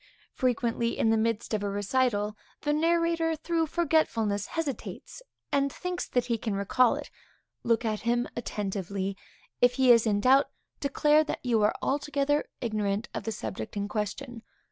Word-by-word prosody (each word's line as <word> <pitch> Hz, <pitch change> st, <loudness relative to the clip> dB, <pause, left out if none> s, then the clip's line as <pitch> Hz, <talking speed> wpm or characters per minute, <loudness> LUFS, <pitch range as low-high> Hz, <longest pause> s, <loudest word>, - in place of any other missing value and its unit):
Frequently, 235 Hz, -2 st, 0 dB
in 225 Hz, -, +3 dB
the -, -, +4 dB
midst 225 Hz, 0 st, -1 dB
of 215 Hz, -, 0 dB
a 205 Hz, -, -1 dB
recital, 210 Hz, +1 st, 0 dB, 0.3 s
the 295 Hz, 0 st, +1 dB
narrator, 330 Hz, +1 st, +2 dB
through 325 Hz, +1 st, -1 dB
forgetfulness, 280 Hz, -, +1 dB
hesitates, 325 Hz, -, -5 dB, 0.3 s
and 280 Hz, 0 st, +2 dB
thinks 360 Hz, +4 st, -4 dB
that 245 Hz, -1 st, 0 dB
he 235 Hz, -2 st, -1 dB
can 215 Hz, -2 st, -2 dB
recall 225 Hz, +5 st, +3 dB
it. -, -, -7 dB, 0.5 s
Look 230 Hz, 0 st, +1 dB
at 215 Hz, -1 st, 0 dB
him 240 Hz, +1 st, 0 dB
attentively. 195 Hz, -3 st, -3 dB, 0.5 s
If 245 Hz, 0 st, +5 dB
he 260 Hz, -1 st, +5 dB
is 230 Hz, -1 st, +5 dB
in 205 Hz, -1 st, +2 dB
doubt, 265 Hz, +6 st, +4 dB, 0.3 s
declare 300 Hz, +2 st, +3 dB
that 300 Hz, -, -5 dB
you 230 Hz, -3 st, +2 dB
are 210 Hz, -, +3 dB
altogether 290 Hz, +1 st, 0 dB, 0.2 s
ignorant 215 Hz, -1 st, -1 dB
of -, -, -5 dB
the 225 Hz, -, -1 dB
subject 110 Hz, -, -5 dB
in 200 Hz, 0 st, -1 dB
question. 225 Hz, +4 st, -4 dB
240 Hz, 160 wpm, -28 LUFS, 210-285 Hz, 0.5 s, If